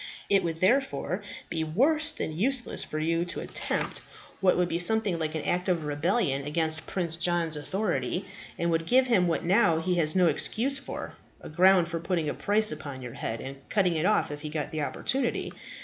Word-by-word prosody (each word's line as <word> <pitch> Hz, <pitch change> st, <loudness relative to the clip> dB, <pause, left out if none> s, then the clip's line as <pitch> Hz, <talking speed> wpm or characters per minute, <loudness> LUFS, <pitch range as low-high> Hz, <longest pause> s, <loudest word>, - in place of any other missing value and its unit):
It 195 Hz, -1 st, +4 dB
would 165 Hz, -1 st, -3 dB
therefore 215 Hz, -3 st, +1 dB, 0.3 s
be 160 Hz, -1 st, -2 dB
worse 290 Hz, -, +2 dB
than 160 Hz, -, -4 dB
useless 245 Hz, +7 st, +2 dB
for 155 Hz, -, -5 dB
you 165 Hz, +2 st, 0 dB
to 175 Hz, -, -3 dB
attempt -, -, -2 dB, 0.4 s
what 185 Hz, -2 st, +3 dB
would 180 Hz, -1 st, +2 dB
be 170 Hz, 0 st, -2 dB
something 200 Hz, -1 st, +2 dB
like 155 Hz, 0 st, -2 dB
an 155 Hz, -, -3 dB
act 180 Hz, +2 st, 0 dB
of 170 Hz, -4 st, 0 dB
rebellion 145 Hz, -, 0 dB
against 155 Hz, +1 st, -1 dB
Prince 170 Hz, -4 st, -2 dB
John's 170 Hz, -2 st, +2 dB
authority, 175 Hz, 0 st, -2 dB, 0.3 s
and 170 Hz, 0 st, 0 dB
would 165 Hz, 0 st, -1 dB
give 255 Hz, +1 st, +4 dB
him 200 Hz, -8 st, +2 dB
what 165 Hz, -, -1 dB
now 175 Hz, -3 st, +3 dB
he 180 Hz, +3 st, -1 dB
has 155 Hz, 0 st, +4 dB
no 185 Hz, -1 st, +4 dB
excuse 235 Hz, -, +2 dB
for, -, -, -7 dB, 0.3 s
a -, -, -10 dB
ground 180 Hz, +2 st, +4 dB
for 165 Hz, 0 st, -4 dB
putting 170 Hz, -1 st, -2 dB
a -, -, -1 dB
price 215 Hz, +1 st, +2 dB
upon 140 Hz, -4 st, -7 dB
your 120 Hz, -2 st, -7 dB
head 110 Hz, 0 st, -4 dB
and 135 Hz, +1 st, -7 dB
cutting 190 Hz, -4 st, +2 dB
it 160 Hz, +4 st, +1 dB
off 215 Hz, -, +1 dB
if 145 Hz, 0 st, -7 dB
he 155 Hz, -, -5 dB
got 150 Hz, -2 st, -4 dB
the 155 Hz, -, -3 dB
opportunity. 260 Hz, -, -1 dB
170 Hz, 200 wpm, -27 LUFS, 155-195 Hz, 0.4 s, It